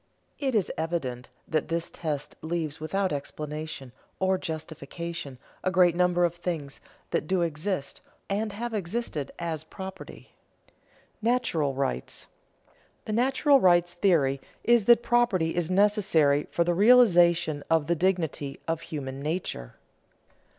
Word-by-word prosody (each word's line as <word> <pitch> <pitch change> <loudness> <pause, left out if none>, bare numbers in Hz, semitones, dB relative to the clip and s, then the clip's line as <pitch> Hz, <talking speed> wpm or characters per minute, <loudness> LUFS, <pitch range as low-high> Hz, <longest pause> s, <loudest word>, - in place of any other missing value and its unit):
It 270 -4 -1
is 205 -5 +1
evident 140 -7 -3 0.2
that 155 -2 0
this 170 0 -2
test 150 -4 -4
leaves 160 -2 -3
without 190 +3 -1
explanation 150 -1 -5 0.3
or 190 0 +2
justification 160 -2 -6 0.3
a - - +2
great 180 -2 +4
number 175 0 +3
of 170 - -1
things 165 -5 -5 0.3
that - - -1
do 185 0 +1
exist 160 -1 -3 0.3
and 210 +2 -1
have 235 +3 -5
existed 190 - -3
as 165 -2 -3
property. 190 +3 -9 0.9
[Sidenote: 230 +2 +2
Natural 160 - 0
rights] 95 - -3 0.8
The 215 - -3
natural 270 +4 +4
rights 175 -3 +4
theory 150 -8 +2 0.2
is 235 -3 +4
that 235 0 +6
property 235 -10 +2
is 175 -1 -1
necessary 185 -8 +3
for 170 - +1
the 175 +1 +1
realization 175 -8 +5
of 165 -2 +3
the 170 +3 +1
dignity 165 -6 -1
of 165 0 -1
human 140 -4 -6
nature. 150 - -4
170 Hz, 130 wpm, -27 LUFS, 150-195 Hz, 0.9 s, that